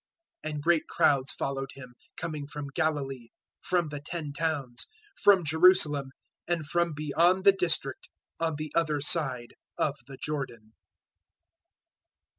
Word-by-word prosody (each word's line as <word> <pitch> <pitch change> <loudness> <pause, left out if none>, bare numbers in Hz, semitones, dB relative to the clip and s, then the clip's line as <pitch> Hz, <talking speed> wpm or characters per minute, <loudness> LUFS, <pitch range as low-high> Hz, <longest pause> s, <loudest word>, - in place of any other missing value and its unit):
004:025 155 - -3
And 150 -1 -5
great 170 -1 +3
crowds 140 -1 +2
followed 135 0 -3
Him, 130 -2 -11 0.2
coming 155 -4 -4
from 145 -1 -6
Galilee, 140 -7 -1 0.3
from 175 -4 +1
the 145 -1 -5
Ten 150 -1 -5
Towns, 145 -6 -2 0.4
from 195 -4 +6
Jerusalem, 155 -3 +4 0.4
and 170 -3 -1
from 170 +2 +1
beyond 165 +5 +2
the 200 - +10
district 170 -8 -2 0.3
on 165 -2 0
the 155 0 -5
other 155 -3 +1
side 135 -6 0 0.2
of 145 -1 0
the 135 -1 -10
Jordan. 125 -8 -5
150 Hz, 130 wpm, -29 LUFS, 140-165 Hz, 0.4 s, the